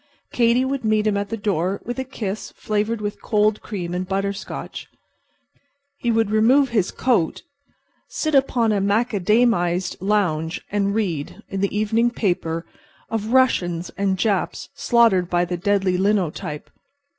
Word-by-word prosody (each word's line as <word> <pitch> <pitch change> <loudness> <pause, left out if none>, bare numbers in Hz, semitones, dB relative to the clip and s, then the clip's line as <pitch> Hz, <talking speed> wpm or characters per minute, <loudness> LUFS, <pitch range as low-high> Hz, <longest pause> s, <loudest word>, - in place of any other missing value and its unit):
Katy 240 +2 +3
would 270 -1 -2
meet 215 -1 +2
him 210 -1 +2
at 200 0 -2
the 225 - -3
door 195 -2 -1
with 245 +2 -4
a - - -1
kiss 215 -6 -5
flavored 215 +1 -1
with 205 0 -4
cold 210 -1 +1
cream 175 -5 -5
and 180 +1 -3
butter 195 +1 -1
scotch. 195 -1 -7 1.1
He 240 - -1
would 225 -2 +2
remove 250 +6 +4
his 210 -6 +1
coat, 225 -11 0 0.7
sit 310 -1 -2
upon 255 -5 +3
a 205 -2 +1
macadamized 205 -3 +1
lounge 180 -5 0
and 200 0 0
read, 175 -10 -3
in 195 -1 -3
the 200 +1 0
evening 220 +3 +2
paper, 175 -7 -1 0.5
of 225 0 -2
Russians 180 -10 +2
and 195 -1 0
Japs 195 0 -1
slaughtered 225 -7 +3
by 175 0 +2
the 175 0 -3
deadly 190 0 +1
linotype. 185 -7 -1
205 Hz, 145 wpm, -22 LUFS, 185-225 Hz, 1.1 s, remove